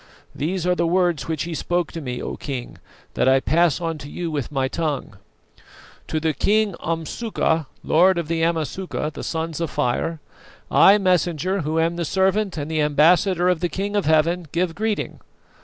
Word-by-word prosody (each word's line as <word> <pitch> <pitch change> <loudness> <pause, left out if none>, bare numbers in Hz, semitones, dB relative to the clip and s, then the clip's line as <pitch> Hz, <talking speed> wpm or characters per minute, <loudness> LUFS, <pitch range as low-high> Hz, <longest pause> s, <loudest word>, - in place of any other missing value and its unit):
These 175 +4 -2
are 180 - +3
the 170 -1 0
words 175 -5 +1
which 160 -2 -2
he 170 0 -5
spoke 175 +1 -1
to 165 - -6
me, 125 -3 -5
O - - -4
King, 130 -4 -6 0.3
that - - +1
I 135 0 +5
pass 165 +3 +2
on 165 -2 -3
to 145 - -9
you 170 0 -4
with 145 -3 -3
my 135 -2 0
tongue: 145 -8 -3 0.9
"To 155 - -1
the 160 0 0
King 210 +2 +2
Umsuka, 165 - -1 0.2
lord 180 +3 +4
of 170 -3 -2
the 165 0 -1
Amasuka, 165 0 -1
the - - -7
Sons 165 0 -3
of 165 - -1
Fire, 155 +6 -1 0.5
I, 200 +2 +7
Messenger, 185 -1 +1
who 155 +1 -1
am 165 +1 +1
the 175 - -1
servant 190 +2 +1
and 150 +1 -4
the 155 -1 +1
ambassador 170 +5 +3
of 180 -2 +2
the 175 - -1
King 200 +5 -3
of 205 - +1
Heaven, 160 +2 +2
give 170 0 0
greeting. 215 +2 -2
165 Hz, 185 wpm, -22 LUFS, 155-180 Hz, 0.9 s, I